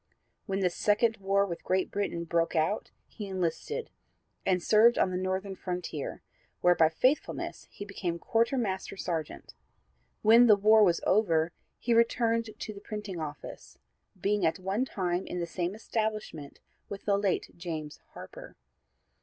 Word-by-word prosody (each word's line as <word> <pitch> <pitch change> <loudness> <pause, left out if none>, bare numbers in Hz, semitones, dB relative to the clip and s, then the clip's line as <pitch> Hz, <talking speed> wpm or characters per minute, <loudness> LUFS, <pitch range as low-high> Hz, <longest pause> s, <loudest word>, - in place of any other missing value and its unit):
When 195 -1 -1
the 180 -2 +2
second 215 +5 +2
war 195 0 +2
with 170 -4 -6
Great 185 0 0
Britain 200 -4 -2
broke 170 0 0
out 160 +7 0 0.2
he 210 - -8
enlisted, 190 - -3 0.6
and 180 -2 +2
served 225 +3 +5
on 185 - +2
the - - -2
Northern 190 +1 -2
frontier, 180 -6 -5 0.4
where 180 - +6
by 160 -2 +4
faithfulness 255 - -1
he 205 - -8
became 180 -4 -3
Quartermaster 225 -2 -1
Sergeant. 165 -5 -4 0.7
When 230 +3 +7
the 215 - +8
war 215 +2 +6
was 175 -4 +3
over 170 -5 +3 0.3
he 235 - 0
returned 230 -1 +2
to 215 - -6
the 200 - -11
printing 210 -5 -6
office, 150 -2 -8 0.4
being 205 +2 +1
at 160 - +2
one 195 +6 -1
time 180 -6 -2
in 180 - -4
the 170 - -1
same 175 +2 -3
establishment 215 -9 -4 0.3
with 200 - -7
the 200 - +3
late 200 -2 0
James 160 -4 -6
Harper. - - -11
195 Hz, 150 wpm, -29 LUFS, 175-215 Hz, 0.7 s, the